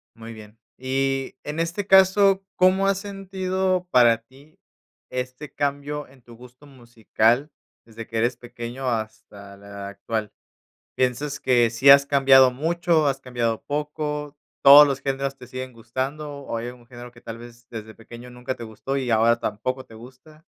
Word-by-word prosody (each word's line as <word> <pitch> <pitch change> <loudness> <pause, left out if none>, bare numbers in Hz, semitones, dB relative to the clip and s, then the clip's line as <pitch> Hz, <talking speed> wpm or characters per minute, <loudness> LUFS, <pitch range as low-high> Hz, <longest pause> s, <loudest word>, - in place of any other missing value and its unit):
Muy 115 0 -10
bien. 110 0 -14 0.2
Y, 135 0 -2
en 150 +2 -5
este 170 +5 -2
caso, 195 0 +5
¿cómo 185 +2 +3
has 195 -1 +2
sentido 190 -2 -2
para 120 -2 +5
ti 135 +6 -21 0.5
este 125 +3 -6
cambio 145 +1 -3
en 135 -1 -21
tu 120 -1 -15
gusto 125 +4 -16
musical 120 +1 -1 0.3
desde 115 0 -10
que 115 - -5
eres 120 +3 +1
pequeño 120 +2 -6
hasta 110 -3 -6
la 100 0 -9
actual? 105 +1 -4 0.6
¿Piensas 135 +3 -1
que 120 -3 +3
sí 120 +4 +3
has 140 0 +8
cambiado 135 -2 +5
mucho, 165 +3 +1
has 135 -1 -1
cambiado 120 -3 -2
poco, 150 0 -4 0.3
todos 145 +2 +10
los 135 -1 -3
géneros 135 0 -2
te 125 - -13
siguen 130 +1 -7
gustando, 130 +6 -5
o 115 - -5
hay 115 +1 -5
algún 120 -1 -12
género 120 0 -11
que 120 -1 -18
tal 115 0 -8
vez 120 0 -14
desde 110 -1 -9
pequeño 120 +2 -12
nunca 125 +1 -6
te - - -9
gustó 115 +5 -5
y 130 -2 -3
ahora 115 +1 +3
tampoco 130 +5 -4
te - - -17
gusta? 130 +7 -16
130 Hz, 165 wpm, -23 LUFS, 115-145 Hz, 0.6 s, todos